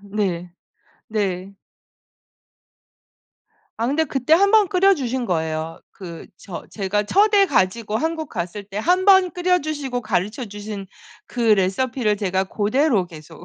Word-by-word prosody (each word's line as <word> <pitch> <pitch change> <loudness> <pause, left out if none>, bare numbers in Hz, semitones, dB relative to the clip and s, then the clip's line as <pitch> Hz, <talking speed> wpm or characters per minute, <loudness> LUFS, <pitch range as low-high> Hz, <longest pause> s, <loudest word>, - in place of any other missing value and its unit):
네. 195 -4 -3 0.6
네. 195 -3 -2 2.2
아 230 - -1
근데 305 +4 +1
그때 270 -1 -2
1 395 +5 +5
번 425 -3 +5
끓여 390 +1 +4
주신 255 -4 -3
거예요. 160 -2 -2
그 170 -4 -10
저 185 -2 -9
제가 205 0 -1
첫애 405 - +4
가지고 215 - 0
한국 320 +2 -2
갔을 180 +1 -5
때 200 0 -11
1 360 +10 +2
번 380 -3 +5
끓여 360 +1 +2
주시고 290 -6 -3
가르쳐 215 +2 -2
주신 205 -1 -7 0.4
그 245 - -6
레시피를 215 +2 +2
제가 190 -2 0
고대로 215 +2 +1
계속 165 0 -13
215 Hz, 230 characters per minute, -21 LUFS, 190-310 Hz, 2.2 s, 1